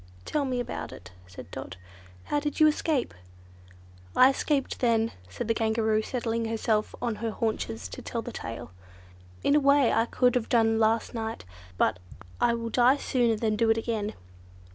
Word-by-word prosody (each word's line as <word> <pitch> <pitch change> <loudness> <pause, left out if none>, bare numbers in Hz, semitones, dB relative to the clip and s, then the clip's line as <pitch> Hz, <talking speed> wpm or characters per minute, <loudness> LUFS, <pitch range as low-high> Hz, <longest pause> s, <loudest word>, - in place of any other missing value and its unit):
"Tell 295 -2 0
me 255 -2 -1
all - - 0
about - - -5
it," 95 -1 -11 0.2
said 90 - -11
Dot. - - -7 0.5
"How 295 - 0
did 295 +2 -3
you 310 - +7
escape?" 305 -3 +1 1.0
"I 260 +1 +7
escaped 275 0 -1
then," 230 -2 +2 0.2
said 90 - -5
the 230 - +3
Kangaroo, 220 -1 +1
settling 230 -1 -2
herself 220 -1 0
on 230 -3 -1
her 230 - -2
haunches 160 - -3
to - - -8
tell - - -4
the - - -6
tale, - - -7 0.7
"in 285 - +3
a - - +6
way 280 -2 +4
I 225 +1 +3
could 250 0 +2
have 245 -3 -1
done 225 -2 +3
last 225 0 +2
night. 225 - -4 0.3
But 90 - +2 0.4
I 235 -1 +3
will 230 0 -4
die 250 +4 +5
sooner 240 -5 +1
than 215 0 0
do 225 +1 +2
it 225 - +4
again." 220 -2 -2
230 Hz, 180 wpm, -27 LUFS, 220-250 Hz, 1.0 s, you